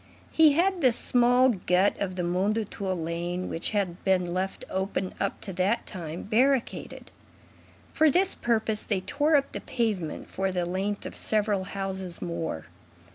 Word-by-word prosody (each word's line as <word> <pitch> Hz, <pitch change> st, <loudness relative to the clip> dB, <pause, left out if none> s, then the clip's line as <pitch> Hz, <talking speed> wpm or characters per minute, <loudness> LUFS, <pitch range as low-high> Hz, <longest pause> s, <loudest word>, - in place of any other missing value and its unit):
He 315 Hz, -2 st, +6 dB
had 360 Hz, +3 st, +2 dB
the 255 Hz, -4 st, +5 dB
small 245 Hz, +2 st, +4 dB
gut 185 Hz, -2 st, +2 dB
of 185 Hz, -2 st, -2 dB
the 180 Hz, -, -2 dB
Mondétour 190 Hz, +1 st, -1 dB
lane, 170 Hz, +2 st, -3 dB
which 165 Hz, -, 0 dB
had 195 Hz, -4 st, -2 dB
been 180 Hz, -2 st, +1 dB
left 190 Hz, +1 st, -3 dB
open 190 Hz, 0 st, -2 dB
up 195 Hz, -, -2 dB
to 195 Hz, -, -6 dB
that 185 Hz, +6 st, 0 dB
time, 170 Hz, -3 st, -6 dB
barricaded. 250 Hz, +4 st, 0 dB, 0.8 s
For 315 Hz, 0 st, +5 dB
this 370 Hz, +5 st, +3 dB
purpose, 220 Hz, -2 st, 0 dB
they 195 Hz, -4 st, -1 dB
tore 295 Hz, +8 st, +1 dB
up 275 Hz, -1 st, +2 dB
the -, -, -5 dB
pavement 210 Hz, -10 st, -2 dB
for 190 Hz, 0 st, -2 dB
the 180 Hz, -1 st, -1 dB
length 195 Hz, +3 st, -2 dB
of -, -, -7 dB
several 205 Hz, -3 st, 0 dB
houses 190 Hz, -2 st, -4 dB
more. 160 Hz, -, -4 dB
195 Hz, 155 wpm, -27 LUFS, 180-235 Hz, 0.8 s, He